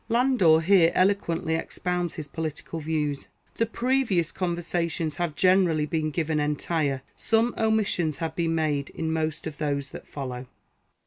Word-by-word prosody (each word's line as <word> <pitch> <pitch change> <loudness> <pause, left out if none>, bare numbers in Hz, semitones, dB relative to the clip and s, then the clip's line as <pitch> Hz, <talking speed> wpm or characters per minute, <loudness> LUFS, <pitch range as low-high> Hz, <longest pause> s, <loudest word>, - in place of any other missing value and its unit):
Landor 230 -10 +4
here 175 -1 +5
eloquently 180 -4 +1
expounds 175 +1 -2
his 155 -4 -6
political 160 +2 -5
views. 150 -2 -2
— - - -33
The 230 - +2
previous 235 -8 +1
Conversations 170 -3 -2
have 170 -4 -2
generally 180 -5 +3
been 155 0 -1
given 155 0 -1
entire; 150 -2 -1
some 225 +2 +1
omissions 205 -9 +1
have 160 0 -4
been 165 -1 0
made 150 -3 0
in 160 0 -3
most 160 -1 -2
of 155 -2 -6
those 140 -2 -2
that - - -10
follow. 130 -3 -6
165 Hz, 145 wpm, -26 LUFS, 150-180 Hz, -, here